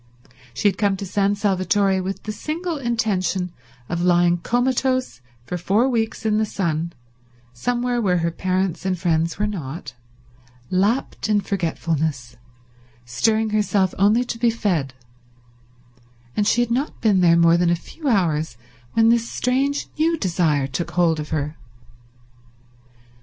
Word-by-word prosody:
She 120 - 0
had 195 -2 0
come 200 -2 +2
to 195 - -5
San 200 +1 +1
Salvatore 195 -1 +1
with 190 +1 -5
the 215 - -4
single 320 - -4
intention 195 -7 -1 0.4
of 170 0 -2
lying 175 0 +3
comatose 255 - 0 0.2
for 175 +8 -4
four 210 +9 +2
weeks 225 -3 -1
in 215 -1 +2
the - - +2
sun, 170 -5 -2 0.6
somewhere 245 - -1
where 185 -4 +2
her 170 0 0
parents 185 0 -1
and 185 -1 -1
friends 165 -1 0
were 210 - 0
not, 170 -8 -5 0.8
lapped 210 +5 0
in 210 -1 +3
forgetfulness, 160 -9 -2 0.7
stirring 215 - +1
herself 205 -3 +1
only 210 +5 +4
to 235 -1 -5
be 235 0 +3
fed, 175 -12 -1 1.4
and 205 - +1
she 240 - +3
had 240 -1 -1
not 265 +5 -1
been 205 -5 +3
there 170 -1 +5
more 170 0 +5
than 175 0 +2
a 175 - +3
few 295 - -8
hours 160 - +1 0.4
when 225 0 +4
this 235 0 +2
strange 275 +3 0
new 330 +1 +2
desire 165 - +1
took 135 +6 -3
hold 170 -3 +2
of 150 - -5
her. 150 0 -2
195 Hz, 145 wpm, -22 LUFS, 170-225 Hz, 1.4 s, there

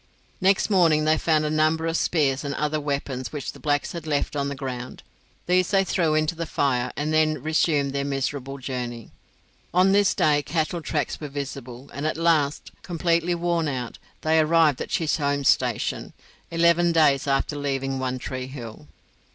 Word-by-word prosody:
Next 195 +3 +3
morning 165 -5 +4
they 155 0 +4
found 155 -1 +1
a 150 - -1
number 155 +1 +2
of 165 0 -1
spears 140 -6 +1
and 140 -1 -3
other 150 0 -1
weapons 140 -3 -3
which 150 -3 -4
the - - -15
blacks 145 -2 0
had 170 -2 -7
left 145 -1 -1
on 140 -1 -1
the 140 - -4
ground; 130 -2 -6 0.4
these 180 0 +2
they 195 -1 +3
threw 165 -5 +1
into 155 +2 +1
the 165 0 -5
fire, 125 -4 0
and 150 +2 -1
then 155 0 +3
resumed 150 -3 +1
their 140 0 -1
miserable 135 0 -3
journey. 125 -3 -5 0.6
On 185 +2 +5
this 200 0 +3
day 145 -1 +3
cattle 165 +2 -2
tracks 155 -1 -2
were 150 - -4
visible, 135 -2 -7
and 145 +2 -2
at 155 - -2
last, 160 -3 +1
completely 170 0 0
worn 170 -1 0
out, 125 -4 -4 0.2
they 160 0 +3
arrived 155 -3 +3
at - - -4
Chisholm's 145 -3 +1
station, - - 0 0.4
eleven 170 +1 +3
days 150 -4 +3
after 135 +2 0
leaving 135 -2 -2
One 130 0 -2
Tree 130 0 -5
Hill. 115 - -9
150 Hz, 175 wpm, -24 LUFS, 140-165 Hz, 0.6 s, On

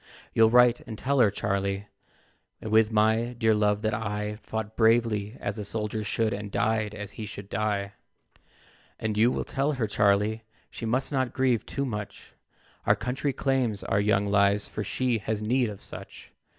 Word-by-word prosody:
You'll 110 0 +5
write 125 0 +5
and 110 - -6
tell 140 +3 0
her, 115 -4 +6
Charlie, 100 0 -2 0.7
With 110 0 +3
my 110 +3 +2
dear 110 -1 +3
love, 105 0 +1
that 110 +1 0
I 105 -1 -3
Fought 110 0 -5
bravely 110 -1 +2
as - - -4
a - - -3
soldier 105 +1 -3
should, 110 +2 0
And 105 0 -5
died 110 -1 0
as 105 0 -6
he 110 - -7
should 100 -2 -9
die. 100 -2 -1 1.1
"And 110 -1 -2
you 115 +4 +4
will - - -2
tell 140 +3 0
her, 125 -5 -1
Charlie, 105 +2 +2 0.3
She 115 - -5
must 130 +6 0
not 130 -3 0
grieve 130 -4 +1
too 140 - -2
much, 105 -5 -6 0.5
Our - - +6
country 130 +3 -2
claims 130 -6 0
our 100 - +1
young 100 -1 +2
lives, 100 0 +2
For 105 - -4
she 120 +3 0
has 110 0 -2
need 120 +3 +1
of 100 -2 -9
such. - - -10
110 Hz, 175 wpm, -27 LUFS, 105-120 Hz, 1.1 s, her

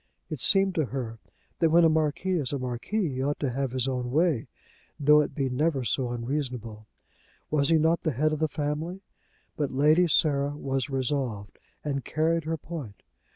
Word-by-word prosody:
It 155 - -4
seemed 195 -1 +4
to 160 -4 +1
her 120 -4 -5 0.4
that 165 - +4
when 170 +2 +5
a - - +7
marquis 160 +3 +1
is 135 -4 -2
a 140 - -1
marquis 130 - -2
he 130 -3 -3
ought 145 +2 -1
to 140 -4 -1
have 135 +2 -1
his 130 0 0
own 125 -2 -2
way, 155 -2 +1 0.5
though 150 +1 +6
it 145 -2 -4
be 135 -2 0
never 135 +1 0
so 125 +2 0
unreasonable. 120 -3 -4 0.6
Was 145 -2 +2
he 165 - +5
not 160 +2 +2
the 155 - -1
head 155 +5 +1
of 155 - -2
the 155 - +2
family? 155 +5 -3 0.6
But 145 -3 0
Lady 155 +6 +4
Sarah 145 -2 +2
was 135 -1 -2
resolved, 130 -7 -2 0.2
and 140 -3 -2
carried 165 +1 0
her 160 +1 -1
point. 150 -10 -8
145 Hz, 185 wpm, -27 LUFS, 130-155 Hz, 0.6 s, a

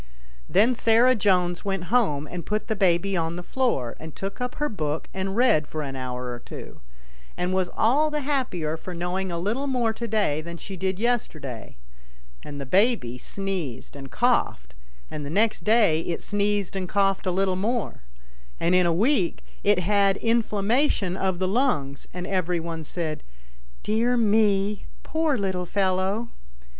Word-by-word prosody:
Then 235 +5 +4
Sarah 235 +2 +4
Jones 180 -6 +1
went 195 0 -3
home 150 -13 +2
and 175 +3 -6
put 210 +4 -2
the 220 - -1
baby 190 0 +2
on 165 -1 -1
the 175 - -6
floor, 205 - -1
and 160 -1 -9
took 195 +5 -5
up 250 0 -3
her 295 - 0
book 155 - -3
and 190 +1 -3
read 235 - +4
for 155 -1 -4
an 135 -1 -5
hour 125 -1 -4
or 120 - -6
two, - - -10 0.6
and 180 +1 -1
was 185 -1 +1
all 285 +8 +3
the 300 0 -2
happier 245 - -1
for 180 +2 -7
knowing 180 +2 -2
a 170 - -2
little 220 +11 -1
more 245 -4 +1
to 235 +1 -5
day 200 -10 +1
than 170 +1 -7
she 195 +3 -8
did 190 0 -1
yesterday, 155 - -2 0.6
and 145 -1 -8
the 140 - -5
baby 185 - +2
sneezed 185 -10 -4
and 135 -1 -8
coughed, - - +1 0.4
and 150 - -5
the 140 - -5
next 215 +7 +1
day 210 -8 +4
it 170 0 -3
sneezed 205 -2 0
and 185 -2 -3
coughed 195 -1 +1
a - - +2
little 190 0 +1
more, 215 - -2 0.6
and 170 +2 +2
in 180 -1 +4
a - - +3
week 195 - +1 0.2
it 205 -1 +4
had 200 +1 +3
inflammation 225 -2 +1
of 190 -2 0
the 185 +1 0
lungs, 185 - 0
and 180 0 -5
every 180 -2 0
one 165 -1 -5
said, 155 0 -3 0.3
" - - -26
Dear 230 +4 +1
me! 210 -2 +2 0.2
poor 315 -3 0
little 190 -3 -2
fellow 195 +4 0
190 Hz, 170 wpm, -25 LUFS, 170-220 Hz, 0.6 s, Then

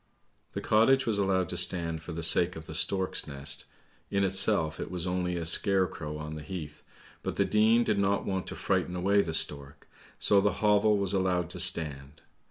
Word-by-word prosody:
" - - -44
The - - -5
cottage 130 +5 +3
was 110 -3 +1
allowed 95 -2 0
to 90 - -2
stand 85 -3 0
for 85 - -9
the 85 +1 -6
sake 85 +2 +2
of 80 -1 -10
the - - -9
stork's 95 -1 -1
nest, 70 0 -3 0.4
in 100 0 0
itself 95 -4 +2
it - - -5
was 90 -1 -4
only 90 -1 -2
a 85 -1 -4
scarecrow 85 -3 +2
on 75 0 -7
the 75 - -7
heath, 75 -3 -8 0.4
but - - -5
the - - +1
Dean 110 +2 +3
did 105 -3 -1
not 100 0 0
want 95 -1 -3
to - - -6
frighten 90 - -2
away 100 +3 +2
the 80 -3 -3
stork, 70 -3 0 0.3
so 100 -1 +4
the 100 +1 0
hovel 105 0 +2
was 100 -1 -1
allowed 90 -3 -1
to 90 - -4
stand. 80 -4 -1
90 Hz, 200 wpm, -28 LUFS, 80-100 Hz, 0.4 s, so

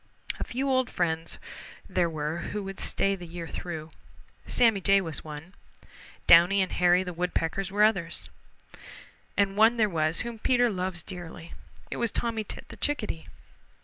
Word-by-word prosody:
A - - -1
few 265 +3 -2
old 260 -2 +2
friends 165 -2 -1 0.5
there 175 -2 +1
were 155 +1 -3
who 205 +3 -4
would 195 0 -7
stay 195 0 +1
the 180 -2 -9
year 165 0 -6
through. 160 -3 -6 0.6
Sammy 225 -5 +3
Jay 195 +1 +5
was 165 -7 -3
one. 155 +4 -9 0.7
Downy 175 +4 +7
and 185 - -4
Hairy 180 +1 +4
the 180 -1 -5
Woodpeckers 180 +2 -1
were 205 +1 +3
others. 190 -6 +1 1.1
And 200 -1 +2
one 225 +3 +5
there 220 -2 +4
was 160 -2 +1
whom 235 -2 -5
Peter 245 0 +3
loves 185 -3 -3
dearly. 175 -2 -8 0.4
It - - -3
was 235 -1 0
Tommy 230 -2 -1
Tit - - -8
the - - -10
Chickadee. 215 - -2
185 Hz, 160 wpm, -28 LUFS, 165-215 Hz, 1.1 s, Downy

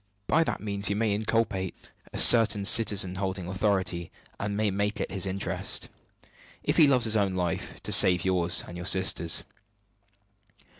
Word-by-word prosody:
By 165 - +1
that - - -4
means 100 -2 -1
you 100 - -2
may 110 -1 -1
inculpate 105 -3 -3 0.2
a - - -7
certain 115 -4 +5
citizen 100 -4 +4
holding 95 -2 -4
authority, 95 -3 -2 0.3
and 100 0 -4
may 105 -1 -1
make 100 +2 -3
it - - -4
his 95 -1 -4
interest, 95 +1 -2 0.7
if - - -2
he 155 - +6
loves 130 -4 +2
his 110 -1 0
own 100 -3 0
life, 90 -2 -4
to - - -4
save 90 -1 +4
yours 90 -2 0
and 85 - -10
your 90 0 -5
sister's." 95 -3 +2
100 Hz, 160 wpm, -26 LUFS, 95-105 Hz, 0.7 s, he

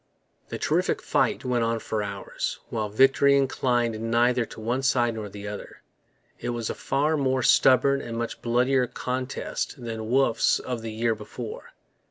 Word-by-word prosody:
The - - -4
terrific - - +1
fight - - 0
went 125 -2 +1
on 115 0 0
for 110 -1 -3
hours, 100 -1 -4
while 110 -2 -2
victory 135 +5 +5
inclined 120 -4 0
neither 120 +1 +2
to - - -11
one 120 +4 -1
side 120 -3 +2
nor 110 -2 -6
the 100 +1 -8
other. 105 0 -8 0.6
It 120 - -4
was 120 -2 -2
a - - -3
far 145 +4 0
more 130 -3 +1
stubborn 140 +3 +5
and 115 0 -6
much 115 0 -4
bloodier 125 +2 +2
contest 130 +2 -4
than 115 -2 -5
Wolfe's 130 -2 +3
of 125 -3 -5
the 115 0 -5
year 115 +1 0
before. 110 +2 -8
120 Hz, 165 wpm, -26 LUFS, 110-130 Hz, 0.6 s, victory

